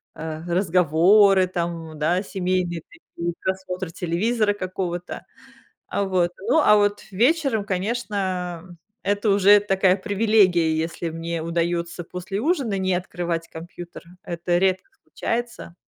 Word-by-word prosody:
э, - - -10 0.2
э, - - -11
разговоры, 185 +2 +4
там, 170 -3 -4
да, 175 +6 +1
семейные 180 -3 -2
такие, 170 +1 -7
просмотр 185 -2 -3
телевизора 205 +6 0
какого-то. 185 -2 -5 0.7
А, 200 - -1
вот, 180 -2 +1 0.2
ну, 270 - +4
а 210 -6 +6
вот 205 0 +1
вечером, 245 - +2
конечно, 185 -4 -3 0.3
это 205 +2 0
уже 200 +1 +6
такая 195 -2 +2
привилегия, 190 -5 +3
если 170 0 -5
мне 165 0 -4
удаётся 170 +1 -2
после 180 +4 -5
ужина 270 - 0
не 190 -1 0
открывать 175 -2 -3
компьютер. 170 +1 -10 0.2
Это 175 +1 -1
редко 190 0 +1
случается. 235 -7 -4
185 Hz, 120 wpm, -23 LUFS, 170-205 Hz, 0.7 s, а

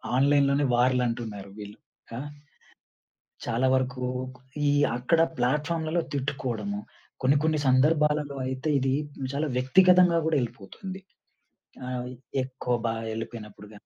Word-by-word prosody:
ఆన్‌లైన్‌లోనే 140 +1 +4
వార్‌లంటున్నారు 120 -5 0
వీళ్ళు 105 0 -9 0.4
ఆహ్, 145 +3 -5 1.2
చాలా 120 +2 +1
వరకు 130 -1 -1 0.7
ఈ - - +4 0.3
అక్కడ 160 +7 +2 0.2
ప్లాట్‌ఫార్మ్‌లలో 155 +6 0
తిట్టుకోవడము. 120 -7 -2 0.4
కొన్ని 135 +3 +4
కొన్ని 155 -1 +2
సందర్భాలలో 150 +1 +3
అయితే 130 +4 -2
ఇది 130 0 +1 0.4
చాలా 150 +2 0
వ్యక్తిగతంగా 180 +5 +5
గూడా 160 -2 +2
యెళ్ళిపోతుంది. 130 - -6 0.9
ఆహ్, 125 -1 -3 0.4
ఎక్కువ 130 -1 -2
బా 115 - 0 0.2
యెళ్ళిపోయినప్పుడు 110 -2 -7
గానీ 105 - -15
130 Hz, 105 wpm, -27 LUFS, 120-150 Hz, 1.2 s, వ్యక్తిగతంగా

